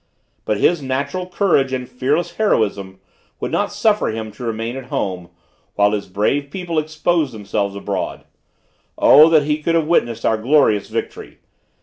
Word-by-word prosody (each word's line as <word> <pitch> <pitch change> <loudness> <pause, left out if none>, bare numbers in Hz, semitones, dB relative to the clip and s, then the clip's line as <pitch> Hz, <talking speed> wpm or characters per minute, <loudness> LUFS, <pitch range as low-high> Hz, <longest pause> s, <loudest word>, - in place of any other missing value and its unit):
But 105 - 0
his 170 +8 +2
natural 140 +7 -3
courage 175 -8 +1
and 130 -1 -3
fearless 140 +8 -2
heroism 100 - 0 0.4
would - - -4
not - - 0
suffer 210 -1 +1
him 110 0 -4
to 105 - -11
remain 115 +1 -3
at 135 -1 -7
home, 90 -7 -4 0.5
while 105 0 +3
his 105 -2 -3
brave 110 +9 -1
people 170 0 -2
exposed 155 -3 -1
themselves 100 -1 -3
abroad. 100 -1 -4 0.7
O, 155 +3 +7
that 155 -3 +4
he 150 +1 -1
could 165 +2 0
have 165 -2 +2
witnessed 120 -8 0
our 110 - +2
glorious 120 -4 +2
victory! - - -5
130 Hz, 155 wpm, -19 LUFS, 105-155 Hz, 0.7 s, O